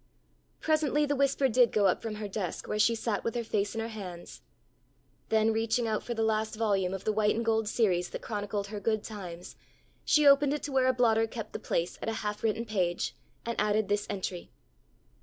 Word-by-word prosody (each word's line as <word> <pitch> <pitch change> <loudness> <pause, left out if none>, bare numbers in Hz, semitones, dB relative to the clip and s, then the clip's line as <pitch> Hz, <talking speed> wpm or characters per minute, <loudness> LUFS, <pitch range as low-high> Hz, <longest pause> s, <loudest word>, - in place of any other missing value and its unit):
Presently 300 -2 +2
the 290 0 0
whisper 275 0 +2
did 245 -1 +4
go 210 -2 +2
up 185 - +2
from 225 -2 -4
her 210 0 -5
desk 195 -3 -4
where 210 - -2
she 230 +2 +4
sat 225 -2 -2
with 230 - -2
her 240 - -1
face 210 -1 -1
in 225 - -1
her 225 - -3
hands. 185 -6 -8 0.9
Then 220 0 +3
reaching 225 +1 0
out 215 -1 0
for 240 - -4
the 225 - 0
last 220 0 0
volume 200 -4 +1
of 195 0 -5
the 215 - +1
white 210 0 +2
and 230 +1 -2
gold 225 -1 +1
series 180 -7 +1
that - - -7
chronicled 205 -2 -3
her 210 -1 -5
good 215 +1 0
times, 180 -5 -8 0.5
she 300 -1 +4
opened 280 0 +6
it 300 - -6
to 290 - -4
where 260 -1 +3
a 260 - +4
blotter 225 -2 +3
kept 220 -1 -7
the - - -4
place 170 +1 -2
at - - -2
a - - -1
half 210 0 -3
written 225 +1 0
page, 185 -5 -1 0.3
and 235 -2 -1
added 210 0 +1
this 205 0 0
entry. 190 -3 -4
220 Hz, 215 wpm, -29 LUFS, 205-230 Hz, 0.9 s, opened